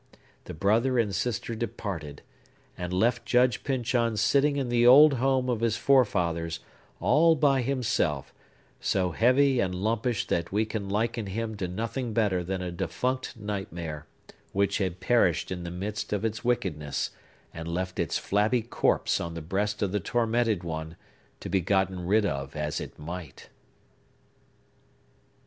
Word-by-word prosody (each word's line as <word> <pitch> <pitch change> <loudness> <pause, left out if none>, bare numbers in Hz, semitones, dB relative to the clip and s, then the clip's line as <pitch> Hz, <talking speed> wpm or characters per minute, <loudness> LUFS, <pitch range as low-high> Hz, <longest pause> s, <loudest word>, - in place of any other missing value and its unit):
The - - -7
brother 115 +9 +2
and 110 -4 +1
sister 115 +2 -2
departed, 100 -10 -5 0.5
and 90 0 -5
left 115 +6 +1
Judge 125 0 +2
Pyncheon 120 -4 0
sitting 140 +7 +3
in 135 -3 -1
the 120 0 +4
old 145 +4 +9
home 130 0 +1
of 120 -3 0
his 115 -1 +1
forefathers, 85 -11 +2 0.4
all 160 +5 +4
by 140 -3 +3
himself; 130 -1 -1 0.5
so 95 -2 0
heavy 130 - +3
and 90 -4 0
lumpish 115 +4 -1
that 85 0 -1
we 105 +3 +1
can 105 -2 -4
liken 110 +1 -1
him 110 +3 -3
to 95 -2 -2
nothing 115 +5 -3
better 100 -6 +1
than 95 +1 -3
a 90 - -4
defunct 125 +10 -3
nightmare, 85 -7 -5 0.5
which 100 +2 +1
had 95 -2 -2
perished 95 -10 +2
in 90 -1 -3
the 85 - -5
midst 100 +4 -4
of 105 +1 -1
its 110 0 -3
wickedness, 95 -13 -1 0.4
and 80 0 -7
left 90 +1 -3
its - - 0
flabby 110 +4 +1
corpse 115 - +1
on 85 -1 -5
the - - -4
breast 105 +5 -1
of 100 - 0
the 105 - 0
tormented 115 -2 0
one, 80 -1 -5 0.4
to - - -7
be 95 - +1
gotten 95 -1 0
rid 105 +2 +3
of 70 -4 -3
as 75 -1 -2
it - - -8
might! 80 -2 -8
105 Hz, 155 wpm, -27 LUFS, 90-120 Hz, 0.5 s, old